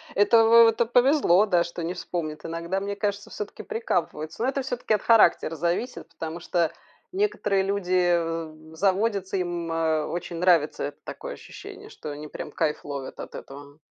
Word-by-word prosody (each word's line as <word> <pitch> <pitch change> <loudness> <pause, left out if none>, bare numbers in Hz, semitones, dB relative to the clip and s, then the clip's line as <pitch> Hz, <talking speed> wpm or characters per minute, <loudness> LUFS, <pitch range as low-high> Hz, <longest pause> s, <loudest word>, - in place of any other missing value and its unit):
Это 225 +3 +5
в 230 0 +8
это 225 +1 +2
повезло, 245 - +4
да, 175 -4 +3
что 170 0 -6
не 170 - -2
вспомнит. 165 -4 -5
Иногда, 170 +3 -2
мне 200 +1 -4
кажется, 205 0 -3
все-таки 210 - -7
прикапываются. 235 - -2
Но 260 - +2
это 275 0 -1
все-таки 245 -3 -2
от 210 - +1
характера 210 -7 +4
зависит, 175 - -2
потому 165 +1 -6
что 170 -1 0 0.4
некоторые 375 - +1
люди, 185 -2 +1
а, 165 -2 -1 0.2
заводятся, 195 +2 0
им, 175 -2 -3
а, 160 -2 +1
очень 175 -1 -5
нравится, 170 -4 +3
это 145 - -6
такое - - -7
ощущение, 410 -1 -11
что 155 - -8
они 150 +1 -7
прям 150 - -7
кайф 150 +1 -1
ловят 140 -2 -6
от - - -8
этого. 145 +2 -11
180 Hz, 170 wpm, -25 LUFS, 165-225 Hz, 0.4 s, в